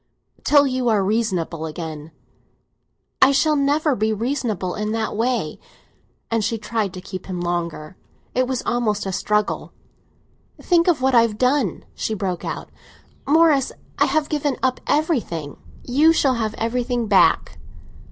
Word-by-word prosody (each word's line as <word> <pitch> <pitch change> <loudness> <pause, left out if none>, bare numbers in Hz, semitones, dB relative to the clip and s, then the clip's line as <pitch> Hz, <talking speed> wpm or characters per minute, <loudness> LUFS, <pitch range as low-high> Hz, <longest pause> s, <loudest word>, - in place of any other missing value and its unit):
"Till 290 -1 +5
you 255 -2 0
are 210 -3 +2
reasonable 185 -7 -1
again." 155 -1 -7 1.1
"I 265 - +7
shall 305 +2 +3
never 290 +1 +2
be 215 0 0
reasonable 220 -5 -2
in 210 +1 -3
that 225 -1 -2
way!" 225 -8 -1 0.7
And 225 -1 +1
she 225 +2 -1
tried 215 -2 -2
to 185 - -7
keep 185 -2 -7
him 185 -2 -4
longer; 175 -2 -3 0.4
it 255 0 +1
was 260 -1 -2
almost 215 -4 0
a 195 - -2
struggle. 210 +2 -1 0.9
"Think 345 -1 +2
of 320 -7 +2
what 265 0 +3
I 235 - +7
have 225 -2 0
done!" 250 - +1
she 220 - -3
broke 185 -4 -3
out. - - -5 0.6
"Morris, 300 -3 +4 0.3
I - - +5
have 310 -1 0
given 290 -3 -1
up 260 -1 +1
everything!" 245 - -1 0.3
"You 300 +6 +4
shall 275 -5 +2
have 220 -3 -2
everything 240 +1 -1
back!" 200 -2 +3
230 Hz, 150 wpm, -21 LUFS, 195-265 Hz, 1.1 s, I